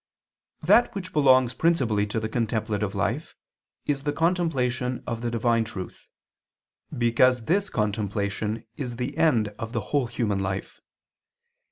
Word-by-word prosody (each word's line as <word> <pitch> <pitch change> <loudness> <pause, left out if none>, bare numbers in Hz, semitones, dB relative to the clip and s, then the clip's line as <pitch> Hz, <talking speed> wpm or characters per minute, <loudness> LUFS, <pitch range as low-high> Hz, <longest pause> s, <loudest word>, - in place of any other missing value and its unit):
That 240 - +4
which 185 -2 -6
belongs 130 -4 +5
principally 120 -9 +1
to 105 - -2
the 110 - -2
contemplative 110 -3 -1
life 115 +9 -2 0.5
is 140 -2 0
the 145 +1 -1
contemplation 135 -7 0
of 115 -1 -4
the 120 - -1
divine 115 0 +2
truth, 100 -5 -8 0.9
because 120 0 +3
this 200 +4 +1
contemplation 105 +1 -2
is 125 -4 -4
the 125 +4 -4
end 120 -10 +3
of 115 +1 -5
the 120 - 0
whole 140 -4 +2
human 115 -4 -1
life. 95 0 -4
120 Hz, 135 wpm, -26 LUFS, 110-135 Hz, 0.9 s, belongs